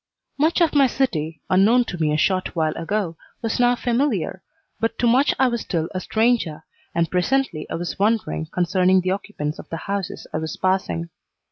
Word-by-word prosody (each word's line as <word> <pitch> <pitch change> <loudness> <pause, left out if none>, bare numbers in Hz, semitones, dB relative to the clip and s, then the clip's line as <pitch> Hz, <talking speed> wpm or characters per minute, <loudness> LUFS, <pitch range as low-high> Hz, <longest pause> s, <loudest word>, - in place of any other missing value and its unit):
Much 320 +4 +2
of 330 - +3
my 280 -2 +5
city, 160 - -2
unknown 220 +7 +5
to 185 - -5
me 155 -2 +2
a 150 - +1
short 185 +4 0
while 155 -2 0
ago, 180 -1 -2 0.3
was 225 +1 -1
now 245 0 +4
familiar, 240 - 0 0.4
but 225 0 -1
to - - +1
much 260 +4 +4
I 265 - +4
was 235 -2 -1
still 165 -3 -2
a 185 - -2
stranger, 220 -7 +1 0.3
and 170 -1 +1
presently 185 - 0
I - - -3
was 175 +2 -4
wondering 200 - 0
concerning 185 +1 +2
the 185 +1 -1
occupants 175 -6 -4
of - - -10
the 165 - -4
houses 200 +1 -4
I - - 0
was 160 -1 -5
passing. 185 -3 -1
190 Hz, 190 wpm, -22 LUFS, 165-235 Hz, 0.4 s, my